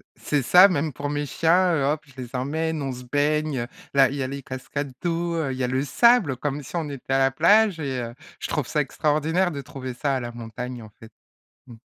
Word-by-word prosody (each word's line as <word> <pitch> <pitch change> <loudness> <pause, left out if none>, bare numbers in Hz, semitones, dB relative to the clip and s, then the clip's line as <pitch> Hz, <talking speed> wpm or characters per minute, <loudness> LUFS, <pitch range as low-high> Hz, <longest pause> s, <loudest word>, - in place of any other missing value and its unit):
C'est 145 -2 -1
ça 180 +9 +8
même 155 -4 -1
pour 145 +3 -4
mes 145 0 -2
chiens, 175 +4 +3
heu, 145 - +1
hop! 150 +2 0
Je 135 - -19
les 125 +1 -8
emmène, 155 +4 -2
on 135 - -2
se 125 0 -8
baigne, 145 +1 0
heu, 120 - -4 0.3
là 135 -2 +6
il 140 - -5
y 130 - -1
les 140 0 -6
cascades 130 +2 -5
d'eau, 170 0 -1
heu. 145 -5 -1
Il 130 - -5
y 130 - -2
a - - +1
le 130 +2 0
sable 185 - +4
comme 145 +1 -3
si 140 - -10
on 165 -3 -1
était 135 -1 -5
à - - +4
la 135 0 +3
plage 200 +5 +4
et 135 -4 -2
heu, 115 0 -6 0.3
je - - -4
trouve 150 -5 -2
ça 150 - +1
extraordinaire 155 +6 +1
de 140 - -5
trouver 130 -1 -7
ça 140 0 0
à 130 - 0
la 120 -1 -5
montagne 120 +1 -7
en 110 - -12
fait. 115 - -13 0.6
Mmh. 120 -3 -12
140 Hz, 245 wpm, -24 LUFS, 130-160 Hz, 0.6 s, ça